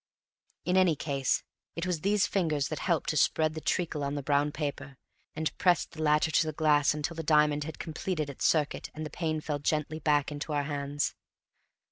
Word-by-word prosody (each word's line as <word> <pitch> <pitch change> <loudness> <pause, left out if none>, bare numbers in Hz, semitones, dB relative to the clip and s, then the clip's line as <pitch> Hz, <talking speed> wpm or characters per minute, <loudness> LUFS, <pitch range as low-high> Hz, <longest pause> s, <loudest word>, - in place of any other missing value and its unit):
In 180 +1 +2
any 185 -4 +4
case 140 -3 0 0.3
it 170 - -3
was 180 -4 -1
these 205 +2 +3
fingers 155 -7 0
that - - -4
helped - - 0
to - - -2
spread 155 -1 +2
the 160 - -6
treacle 160 -4 -1
on 140 +1 -2
the 145 - -3
brown 145 +1 +2
paper, 145 -2 -5 0.4
and 160 0 -2
pressed 180 -4 +3
the 160 - -8
latter 150 +1 +3
to 155 - +3
the - - -1
glass 150 -1 +3
until 150 +3 -3
the 165 - -4
diamond 150 -1 +3
had 160 -1 -7
completed 160 -1 -3
its 140 - -4
circuit 150 -3 +1
and 155 0 -5
the 155 - -7
pane 155 -2 -2
fell 150 -1 -3
gently 155 +1 -1
back 150 -2 +2
into 150 +1 -4
our 145 -1 +1
hands. 145 0 -2
150 Hz, 200 wpm, -29 LUFS, 145-160 Hz, 0.4 s, any